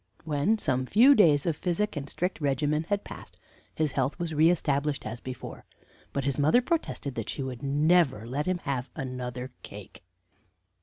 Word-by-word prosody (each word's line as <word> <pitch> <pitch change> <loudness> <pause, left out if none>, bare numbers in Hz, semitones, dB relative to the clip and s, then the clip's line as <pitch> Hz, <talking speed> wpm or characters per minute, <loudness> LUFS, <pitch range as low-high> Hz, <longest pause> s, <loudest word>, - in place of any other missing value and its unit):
When 155 +8 +1
some 130 -9 -1
few 245 - +7
days 155 - +4
of 165 -3 +1
physic 180 +6 -1
and 145 -1 -5
strict 180 -1 -3
regimen 150 +2 0
had 205 0 0
passed, - - -11 0.4
his 155 -2 0
health 135 +1 -1
was 170 -2 -3
re 155 +2 +5
established 145 -4 0
as 110 +2 -5
before; 130 -1 -8 0.5
but 140 - -2
his 140 +1 -1
mother 155 +12 +5
protested 250 - -2
that 115 -3 -5
she 140 - -3
would 130 -2 -6
never 145 -4 +2
let 140 +7 -3
him 185 -1 +1
have 135 -2 -2
another 125 -1 -5
cake." 100 -2 -11
145 Hz, 170 wpm, -28 LUFS, 130-170 Hz, 0.5 s, few